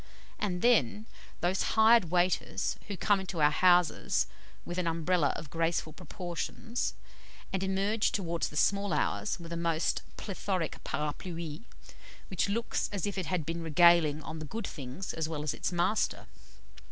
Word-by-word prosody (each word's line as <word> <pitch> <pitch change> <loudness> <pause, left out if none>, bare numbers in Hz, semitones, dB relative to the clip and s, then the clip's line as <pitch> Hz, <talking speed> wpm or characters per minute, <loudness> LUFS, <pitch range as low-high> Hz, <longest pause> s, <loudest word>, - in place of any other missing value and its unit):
And 180 -4 -2
then, 215 - +3 0.4
those 180 +2 +1 0.2
hired 225 -1 +7
waiters 175 +2 +1
who 200 -2 -4
come 205 +1 +3
into 190 -3 -5
our 150 0 +5
houses 175 0 +3 0.4
with 175 +1 -3
an 175 - 0
Umbrella 165 -1 +2
of 150 - -7
graceful 165 -1 0
proportions, 185 +7 -4 0.6
and 190 - 0
emerge 195 +3 +1
towards 170 -4 -1
the 150 - -7
small 200 +2 +2
hours 100 - 0
with 170 0 -7
a - - -2
most 165 -1 0 0.2
plethoric 190 -4 -3
parapluie, 160 +3 -4 0.6
which 190 +1 0
looks 230 +3 -1
as 200 -4 -2
if 205 - -3
it 185 -5 -3
had 180 -5 -1
been 165 +2 -3
regaling 165 -1 +5
on 160 0 -6
the 155 - -5
good 220 +8 -4
things 140 +5 -6
as 160 -1 -2
well 150 -2 -3
as 150 - -1
its - - -2
master! 180 +5 0
175 Hz, 155 wpm, -30 LUFS, 160-195 Hz, 0.6 s, hired